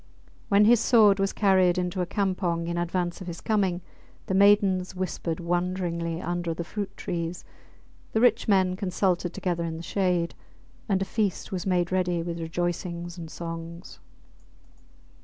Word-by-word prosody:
When 205 Hz, +1 st, +5 dB
his 235 Hz, +1 st, +6 dB
sword 215 Hz, -4 st, +5 dB
was 195 Hz, 0 st, +1 dB
carried 190 Hz, -3 st, +3 dB
into 180 Hz, +1 st, -1 dB
a 180 Hz, -, -1 dB
campong 185 Hz, -4 st, -1 dB
in 170 Hz, 0 st, -3 dB
advance 175 Hz, +1 st, -2 dB
of 185 Hz, -, -7 dB
his 170 Hz, -1 st, -6 dB
coming, 195 Hz, -5 st, 0 dB, 0.4 s
the -, -, -2 dB
maidens 195 Hz, -2 st, +4 dB
whispered 180 Hz, -3 st, -3 dB
wonderingly 175 Hz, -1 st, -1 dB
under 175 Hz, -1 st, -2 dB
the 170 Hz, -, -3 dB
fruit 200 Hz, +3 st, -5 dB
trees, 170 Hz, 0 st, -4 dB, 0.7 s
the 220 Hz, -, +1 dB
rich 235 Hz, -1 st, +3 dB
men 190 Hz, -3 st, +3 dB
consulted 180 Hz, -2 st, 0 dB
together 175 Hz, -2 st, -2 dB
in 165 Hz, -1 st, -4 dB
the 165 Hz, -, -7 dB
shade, 180 Hz, -2 st, 0 dB, 0.6 s
and 195 Hz, -1 st, +2 dB
a -, -, -4 dB
feast 210 Hz, -1 st, -2 dB
was 185 Hz, 0 st, -3 dB
made 180 Hz, -1 st, +1 dB
ready 180 Hz, -2 st, 0 dB
with 170 Hz, 0 st, -4 dB
rejoicing 175 Hz, +1 st, -3 dB
and 165 Hz, -3 st, -8 dB
songs. 165 Hz, +1 st, -7 dB
180 Hz, 155 wpm, -26 LUFS, 170-195 Hz, 0.7 s, his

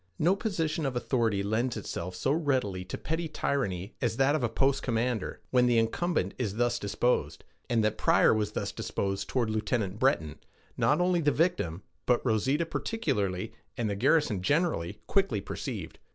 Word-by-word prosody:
No 180 Hz, +5 st, +3 dB
position 165 Hz, -8 st, -1 dB
of 130 Hz, -, -3 dB
authority 115 Hz, -5 st, +1 dB
lends 115 Hz, +4 st, 0 dB
itself 90 Hz, -3 st, -5 dB
so 135 Hz, -, 0 dB
readily 130 Hz, -, 0 dB
to -, -, -5 dB
petty 160 Hz, +1 st, -2 dB
tyranny 105 Hz, -, -2 dB
as 115 Hz, -2 st, 0 dB
that 135 Hz, +2 st, +4 dB
of 155 Hz, -, +1 dB
a 120 Hz, -, +2 dB
post 135 Hz, +4 st, +1 dB
commander, 120 Hz, -3 st, -1 dB
when 125 Hz, -1 st, +4 dB
the 120 Hz, -1 st, +3 dB
incumbent 115 Hz, -, 0 dB
is 105 Hz, -5 st, -1 dB
thus 120 Hz, +1 st, +1 dB
disposed; 100 Hz, -6 st, 0 dB, 0.3 s
and 115 Hz, -2 st, +2 dB
that 110 Hz, -, 0 dB
Pryor -, -, +5 dB
was 105 Hz, -2 st, -1 dB
thus -, -, -2 dB
disposed 95 Hz, -1 st, -3 dB
toward 120 Hz, -4 st, 0 dB
Lieutenant 110 Hz, -2 st, -1 dB
Breton, 80 Hz, -, +1 dB, 0.4 s
not 150 Hz, -, +2 dB
only 180 Hz, -1 st, +2 dB
the 145 Hz, -1 st, +3 dB
victim, 145 Hz, -, 0 dB, 0.2 s
but 125 Hz, +1 st, +2 dB
Rosita 130 Hz, +8 st, +2 dB
particularly, 115 Hz, -, -2 dB, 0.2 s
and 110 Hz, -3 st, 0 dB
the -, -, -1 dB
garrison 125 Hz, -, +2 dB
generally, 105 Hz, -, 0 dB
quickly 195 Hz, -, +1 dB
perceived. -, -, -6 dB
120 Hz, 165 wpm, -29 LUFS, 100-145 Hz, 0.4 s, Pryor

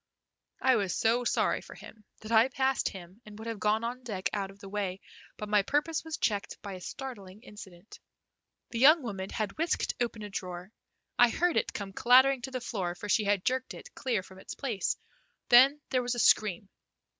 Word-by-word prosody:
I 260 Hz, -2 st, +5 dB
was 195 Hz, -4 st, -1 dB
so 235 Hz, +2 st, +2 dB
sorry -, -, +1 dB
for -, -, -12 dB
him 215 Hz, -, -13 dB, 0.2 s
that 220 Hz, +1 st, -8 dB
I 225 Hz, +2 st, +6 dB
passed 265 Hz, 0 st, 0 dB
him 185 Hz, +3 st, -12 dB
and 210 Hz, -1 st, -12 dB
would 220 Hz, +1 st, -8 dB
have 225 Hz, -2 st, -4 dB
gone 215 Hz, +2 st, +1 dB
on 245 Hz, +2 st, -4 dB
deck 205 Hz, -7 st, -3 dB
out 195 Hz, -2 st, -2 dB
of 195 Hz, -, -14 dB
the 200 Hz, -, -11 dB
way, 195 Hz, -2 st, -3 dB, 0.4 s
but 210 Hz, -, -5 dB
my 210 Hz, 0 st, +4 dB
purpose 295 Hz, +9 st, -1 dB
was 320 Hz, -1 st, -5 dB
checked 205 Hz, -3 st, -2 dB
by 200 Hz, -2 st, -6 dB
a 185 Hz, -, -8 dB
startling 210 Hz, -5 st, -8 dB
incident. 195 Hz, -3 st, -13 dB, 0.7 s
The 230 Hz, -, -3 dB
young 300 Hz, +4 st, +7 dB
woman 195 Hz, -5 st, -5 dB
had 215 Hz, +4 st, -4 dB
whisked 330 Hz, 0 st, 0 dB
open 230 Hz, -3 st, -2 dB
a 210 Hz, -, -6 dB
drawer. 180 Hz, 0 st, -6 dB, 0.5 s
I 245 Hz, -, +7 dB
heard 350 Hz, +7 st, +1 dB
it -, -, +1 dB
come 195 Hz, -2 st, -6 dB
clattering 260 Hz, +3 st, +5 dB
to 265 Hz, -, -5 dB
the 255 Hz, -, -3 dB
floor, 190 Hz, -7 st, -3 dB
for 205 Hz, +3 st, -8 dB
she 210 Hz, +1 st, +3 dB
had 200 Hz, -2 st, +1 dB
jerked 260 Hz, 0 st, -1 dB
it -, -, -12 dB
clear 240 Hz, -8 st, -1 dB
from 190 Hz, 0 st, -14 dB
its -, -, -8 dB
place; 225 Hz, -9 st, -2 dB, 0.5 s
then 265 Hz, +5 st, +7 dB
there 255 Hz, -, +2 dB
was 245 Hz, 0 st, -2 dB
a -, -, -3 dB
scream. 200 Hz, -4 st, +3 dB
220 Hz, 205 wpm, -29 LUFS, 195-255 Hz, 0.7 s, young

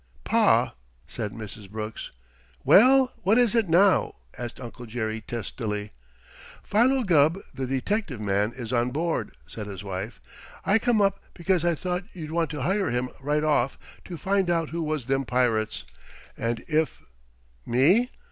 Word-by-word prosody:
"Pa," -, -, +3 dB, 0.3 s
said 105 Hz, -, -4 dB
Mrs. 105 Hz, -2 st, -9 dB
Brooks. 110 Hz, +1 st, -6 dB, 0.5 s
"Well, 260 Hz, +4 st, +6 dB
what 200 Hz, +5 st, +3 dB
is 245 Hz, -3 st, +4 dB
it 225 Hz, -6 st, +2 dB
now?" 185 Hz, +4 st, +4 dB, 0.2 s
asked 120 Hz, -1 st, -7 dB
Uncle 120 Hz, 0 st, -9 dB
Jerry 110 Hz, -1 st, -3 dB
testily. 105 Hz, -2 st, -4 dB, 0.7 s
"Philo 255 Hz, +5 st, +3 dB
Gubb, 165 Hz, -3 st, +4 dB, 0.2 s
the 130 Hz, -1 st, -4 dB
detective 135 Hz, -, -2 dB
man, 105 Hz, +1 st, 0 dB
is 120 Hz, -1 st, -6 dB
on 120 Hz, 0 st, +2 dB
board," 160 Hz, -, -2 dB
said 105 Hz, +6 st, -7 dB
his 100 Hz, -2 st, -7 dB
wife. 100 Hz, +3 st, -5 dB, 0.5 s
"I 200 Hz, +3 st, +4 dB
come 235 Hz, -2 st, +2 dB
up 195 Hz, 0 st, +1 dB, 0.2 s
because 175 Hz, -1 st, +1 dB
I 170 Hz, -1 st, +2 dB
thought 180 Hz, +3 st, -3 dB
maybe 185 Hz, -4 st, -12 dB
you'd 155 Hz, 0 st, -6 dB
want 165 Hz, -1 st, 0 dB
to 150 Hz, -4 st, -4 dB
hire 195 Hz, +5 st, +1 dB
him 125 Hz, +1 st, -1 dB
right 150 Hz, +2 st, 0 dB
off 145 Hz, -4 st, +1 dB, 0.3 s
to 175 Hz, -, -7 dB
find 195 Hz, 0 st, +1 dB
out 165 Hz, -2 st, 0 dB
who 170 Hz, +1 st, -2 dB
was 155 Hz, -5 st, -2 dB
them 135 Hz, +1 st, 0 dB
pirates, 120 Hz, -4 st, 0 dB, 0.5 s
and 115 Hz, 0 st, -2 dB
if 160 Hz, -1 st, 0 dB, 0.3 s
" -, -, -37 dB, 0.3 s
"Me? 170 Hz, -, +4 dB
145 Hz, 160 wpm, -26 LUFS, 115-185 Hz, 0.7 s, Well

